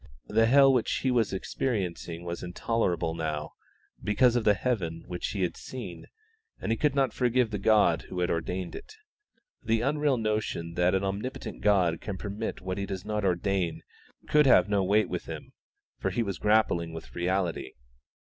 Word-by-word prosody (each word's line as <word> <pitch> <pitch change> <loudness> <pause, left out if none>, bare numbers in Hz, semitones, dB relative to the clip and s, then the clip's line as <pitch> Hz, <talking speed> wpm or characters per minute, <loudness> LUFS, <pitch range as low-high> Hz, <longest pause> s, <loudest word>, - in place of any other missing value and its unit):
The 115 +1 +4
hell 135 +2 +6
which 125 -3 +1
he 130 - +1
was 120 -3 +2
experiencing 95 -5 -3
was 85 0 -4
intolerable 90 -3 -1
now, 75 -2 -3 0.5
because 120 +3 +3
of 120 - +1
the 105 - +5
heaven 90 -7 -2
which 90 -1 -4
he 100 -3 -2
had 90 - -1
seen, 110 -9 -8 0.5
and - - -2
he - - +3
could 145 +3 +1
not 135 -5 +2
forgive 125 -2 +1
the 105 - -2
God 100 -6 +3
who 90 - -4
had 90 - +1
ordained 90 +2 -3
it. 430 - -10 0.7
The 115 0 +1
unreal 145 +1 +1
notion 105 -6 -2
that 90 +2 +2
an 95 - 0
omnipotent 105 +3 -4
God 95 -5 +3
can 100 -3 -5
permit 105 +3 -4
what 95 +1 -3
He 100 - -3
does 95 -2 -5
not 105 -1 -2
ordain 95 -2 0 0.4
could 150 -1 +5
have 90 -7 +6
no 100 -2 +2
weight 100 +2 +3
with - - -4
him, - - -8 0.5
for - - 0
he 120 - 0
was 100 -5 -4
grappling 105 -6 +2
with 80 - -9
reality. 90 0 -1
100 Hz, 175 wpm, -28 LUFS, 90-115 Hz, 0.7 s, hell